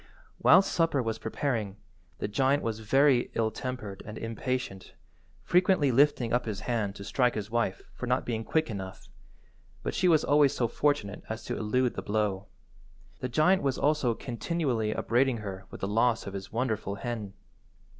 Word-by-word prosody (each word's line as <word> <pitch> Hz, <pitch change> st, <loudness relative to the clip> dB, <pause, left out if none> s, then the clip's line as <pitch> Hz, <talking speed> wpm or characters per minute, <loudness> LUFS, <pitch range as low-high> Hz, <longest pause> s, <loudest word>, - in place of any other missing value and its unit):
Whilst 195 Hz, -, +6 dB
supper 165 Hz, -4 st, +2 dB
was 110 Hz, -1 st, -3 dB
preparing, 110 Hz, -4 st, -2 dB, 0.4 s
the -, -, -3 dB
giant 135 Hz, +7 st, +1 dB
was 110 Hz, -1 st, -2 dB
very 135 Hz, +3 st, +3 dB
ill–tempered 110 Hz, -2 st, -3 dB
and 105 Hz, +1 st, -8 dB
impatient, 115 Hz, -3 st, -4 dB, 0.5 s
frequently 180 Hz, -6 st, +3 dB
lifting 125 Hz, -3 st, +3 dB
up 125 Hz, 0 st, +1 dB
his 105 Hz, -3 st, -4 dB
hand 110 Hz, -5 st, -1 dB
to 100 Hz, -, -8 dB
strike 125 Hz, +4 st, +1 dB
his 105 Hz, 0 st, -4 dB
wife 115 Hz, -5 st, -1 dB
for 125 Hz, -, -6 dB
not 125 Hz, +1 st, +1 dB
being 115 Hz, -2 st, -2 dB
quick 160 Hz, 0 st, 0 dB
enough, 95 Hz, -2 st, -7 dB, 0.7 s
but -, -, -2 dB
she 185 Hz, -, +2 dB
was 160 Hz, -3 st, +4 dB
always 145 Hz, -1 st, +4 dB
so 120 Hz, -, +1 dB
fortunate 120 Hz, -5 st, 0 dB
as 110 Hz, 0 st, -5 dB
to -, -, -3 dB
elude 125 Hz, +3 st, 0 dB
the -, -, -4 dB
blow. 100 Hz, -2 st, -1 dB, 0.7 s
The 130 Hz, -, -3 dB
giant 180 Hz, +9 st, +3 dB
was 135 Hz, -2 st, 0 dB
also 145 Hz, -5 st, +2 dB
continually 125 Hz, -3 st, -2 dB
upbraiding 125 Hz, +3 st, +1 dB
her 95 Hz, -3 st, -7 dB
with -, -, -10 dB
the 95 Hz, -, -1 dB
loss 115 Hz, +2 st, +2 dB
of 100 Hz, -, -6 dB
his 95 Hz, -1 st, -7 dB
wonderful 110 Hz, -4 st, -1 dB
hen. 105 Hz, -2 st, -5 dB
120 Hz, 165 wpm, -29 LUFS, 105-135 Hz, 0.7 s, Whilst